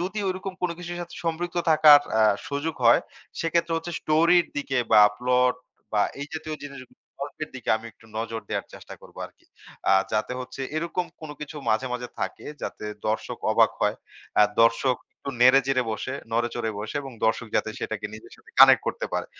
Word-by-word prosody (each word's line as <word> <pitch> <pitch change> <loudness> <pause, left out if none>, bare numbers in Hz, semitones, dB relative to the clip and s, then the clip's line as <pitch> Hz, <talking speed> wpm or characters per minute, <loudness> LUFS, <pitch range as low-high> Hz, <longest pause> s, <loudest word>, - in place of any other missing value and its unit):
যদি 185 +4 -3
ঐরকম 185 +1 -3
কোন 180 - +1
কিছুর 175 0 -6
সাথে 175 -1 -8
সম্পৃক্ত 170 +2 -2
থাকার 155 -2 +8 0.2
আ - - +6 0.3
সুযোগ 145 +3 -2
হয়, 115 0 +7 0.4
সেক্ষেত্রে 170 0 0
হচ্ছে 165 +1 -4
স্টোরির 170 +3 +4
দিকে 140 -2 -2 0.2
বা, 110 - +8 0.2
প্লট 125 0 +3 0.4
বা, 105 - +2 0.2
এই 145 - -4
জাতীয় 155 -1 -5
জিনিস 140 -2 -8 0.4
গল্পের 145 +2 -5
দিকে 125 - -10
আমি 110 +1 -10
একটু 110 - -22
নজর 115 0 -3
দেওয়ার - - -3
চেষ্টা - - -11
করবো - - -15
আরকি। - - -25 0.5
আ - - +6 0.2
যাতে 110 +3 0
হচ্ছে 130 +1 -8 0.2
এরকম 170 +2 -2
কোন 155 -2 -8
কিছু 150 +1 -7
মাঝে, 110 +4 +1
মাঝে 125 0 -4
থাকে - - -4 0.2
যাতে - - -5 0.2
দর্শক 110 0 -2
অবাক - - +5
হয়। - - +2 0.4
অ্যা 105 - +7 0.2
দর্শক 115 +3 +3 0.2
একটু 140 - -7
নেড়ে-চেড়ে 130 +1 +5
বসে 110 +4 -4 0.2
নড়ে-চড়ে 120 -1 -1
বসে 105 +1 -6
এবং 135 - -8
দর্শক 110 +1 +1
যাতে 110 - 0
সেটাকে 110 -1 -4
নিজের 110 - -12
সাথে - - -20
কানেক্ট - - +9
করতে - - -2
পারে। - - -1
135 Hz, 180 wpm, -25 LUFS, 115-165 Hz, 0.5 s, কানেক্ট